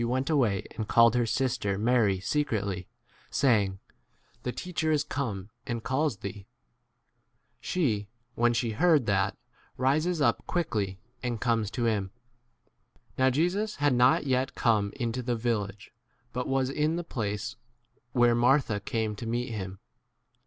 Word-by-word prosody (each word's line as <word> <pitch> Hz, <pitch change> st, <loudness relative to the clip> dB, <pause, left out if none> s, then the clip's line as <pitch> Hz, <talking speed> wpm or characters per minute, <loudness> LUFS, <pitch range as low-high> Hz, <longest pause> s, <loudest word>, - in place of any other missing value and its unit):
went 130 Hz, +5 st, 0 dB
away 115 Hz, -10 st, +2 dB
and 110 Hz, -2 st, -3 dB
called 115 Hz, -1 st, +6 dB
her 120 Hz, -1 st, +1 dB
sister 110 Hz, -5 st, 0 dB
Mary 110 Hz, -3 st, +2 dB
secretly, 100 Hz, -6 st, -1 dB, 0.4 s
saying, 105 Hz, -8 st, +2 dB, 0.6 s
The 125 Hz, -, -2 dB
teacher 175 Hz, +2 st, -3 dB
29 155 Hz, -, +4 dB
is 145 Hz, -, +1 dB
come 105 Hz, -10 st, -4 dB, 0.2 s
and 115 Hz, -2 st, -3 dB
calls 135 Hz, -1 st, 0 dB
thee. 100 Hz, 0 st, -7 dB, 1.1 s
She, 140 Hz, -, 0 dB
ff 100 Hz, -, -10 dB, 0.3 s
when 120 Hz, +1 st, +2 dB
she 115 Hz, -1 st, 0 dB
heard 150 Hz, +2 st, +3 dB
[that], 100 Hz, -2 st, +1 dB, 0.4 s
rises 155 Hz, +7 st, +1 dB
up 145 Hz, -, +3 dB
30 -, -, -23 dB
quickly 105 Hz, -, -1 dB, 0.2 s
and 120 Hz, -2 st, -2 dB
comes 115 Hz, -4 st, +1 dB
to 120 Hz, +2 st, -2 dB
him. 105 Hz, -4 st, 0 dB, 1.1 s
Now 130 Hz, 0 st, +5 dB
Jesus 180 Hz, -, 0 dB
had 145 Hz, -1 st, +2 dB
not 125 Hz, +3 st, +4 dB
yet 130 Hz, 0 st, 0 dB
come 105 Hz, -4 st, +2 dB
into 120 Hz, -1 st, -2 dB
the 120 Hz, 0 st, -1 dB
village, 105 Hz, -3 st, -2 dB, 0.4 s
but 125 Hz, 0 st, -2 dB
was 135 Hz, -1 st, +1 dB
in 150 Hz, +3 st, +1 dB
the 175 Hz, -, -2 dB
place 105 Hz, -8 st, -3 dB, 0.6 s
where 120 Hz, -2 st, +4 dB
31 120 Hz, -, +2 dB
Martha 125 Hz, -4 st, +3 dB
came 110 Hz, +1 st, -2 dB
to 115 Hz, -, -6 dB
meet 120 Hz, +1 st, -2 dB
him. 95 Hz, -3 st, -5 dB
120 Hz, 150 wpm, -28 LUFS, 105-135 Hz, 1.1 s, called